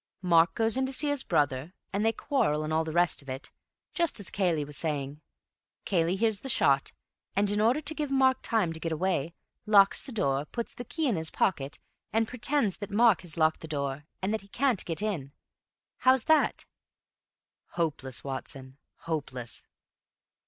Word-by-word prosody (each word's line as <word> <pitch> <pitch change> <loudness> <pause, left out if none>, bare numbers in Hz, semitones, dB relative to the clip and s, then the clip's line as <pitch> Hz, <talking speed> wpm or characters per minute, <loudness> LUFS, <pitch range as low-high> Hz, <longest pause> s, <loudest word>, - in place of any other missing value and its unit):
Mark 170 -1 +4
goes 225 +1 +2
in 265 0 +1
to - - -4
see 290 +2 +1
his 285 -2 0
brother, 150 +1 0 0.2
and 200 +2 0
they 225 - +4
quarrel 205 - 0
and 155 +1 -3
all 160 +1 +2
the 160 - -5
rest 175 -1 +2
of 140 - -13
it, 130 +1 -6 0.4
just 340 -8 +1
as 200 - -4
Cayley 170 -7 +1
was 145 0 -8
saying. 145 -2 -3 0.6
Cayley 175 -1 +1
hears 220 0 +1
the 270 - -5
shot, 140 - +3 0.4
and 200 +1 +2
in 205 0 +1
order 240 +7 +3
to 310 +1 0
give 300 -2 -3
Mark 265 -1 +3
time 205 -8 +1
to 160 - -5
get 165 0 -3
away, 170 -1 -1 0.3
locks 200 -2 +6
the 270 - -6
door, 145 - 0
puts 235 +8 -5
the 245 - -7
key 315 +5 -1
in 225 -8 +1
his 160 0 +1
pocket 145 -7 -1 0.3
and 225 +1 +1
pretends 250 -4 -1
that 205 - -6
Mark 220 -2 +4
has 175 -3 -8
locked 155 -1 +2
the 160 - -7
door, 140 -1 -3 0.2
and 200 +3 0
that 220 - -1
he 195 - -18
can't 245 0 +1
get 165 +4 0
in. 155 -11 -3 0.6
How's 260 -2 +4
that?" 315 -1 +2 1.1
"Hopeless, 140 -7 -2
Watson, 135 0 -6 0.2
hopeless." 135 -7 -4
180 Hz, 185 wpm, -29 LUFS, 150-225 Hz, 1.1 s, locks